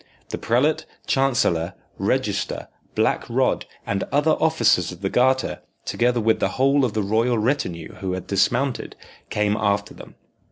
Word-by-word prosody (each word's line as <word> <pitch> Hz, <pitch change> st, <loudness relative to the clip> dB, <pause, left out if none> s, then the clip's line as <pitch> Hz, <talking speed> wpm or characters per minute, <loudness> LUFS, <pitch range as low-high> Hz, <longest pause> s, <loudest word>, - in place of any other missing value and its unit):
The -, -, -4 dB
prelate, 150 Hz, +7 st, +1 dB, 0.2 s
chancellor, 105 Hz, -10 st, +1 dB, 0.2 s
register, -, -, -1 dB, 0.3 s
black -, -, +1 dB
rod, -, -, +1 dB, 0.2 s
and 100 Hz, -1 st, -1 dB
other 145 Hz, +3 st, +3 dB
officers 160 Hz, -, +3 dB
of 90 Hz, 0 st, -11 dB
the 95 Hz, -, -1 dB
Garter, 130 Hz, +1 st, +2 dB, 0.2 s
together 120 Hz, 0 st, +1 dB
with 110 Hz, 0 st, +2 dB
the -, -, +2 dB
whole 135 Hz, +1 st, +4 dB
of 120 Hz, -5 st, 0 dB
the 110 Hz, -, 0 dB
royal 115 Hz, +4 st, +1 dB
retinue 105 Hz, -, -1 dB
who 95 Hz, -1 st, -3 dB
had 95 Hz, -, -4 dB
dismounted, 120 Hz, +7 st, 0 dB, 0.3 s
came 105 Hz, 0 st, +1 dB
after 100 Hz, -1 st, 0 dB
them. -, -, -13 dB
115 Hz, 150 wpm, -23 LUFS, 100-135 Hz, 0.3 s, whole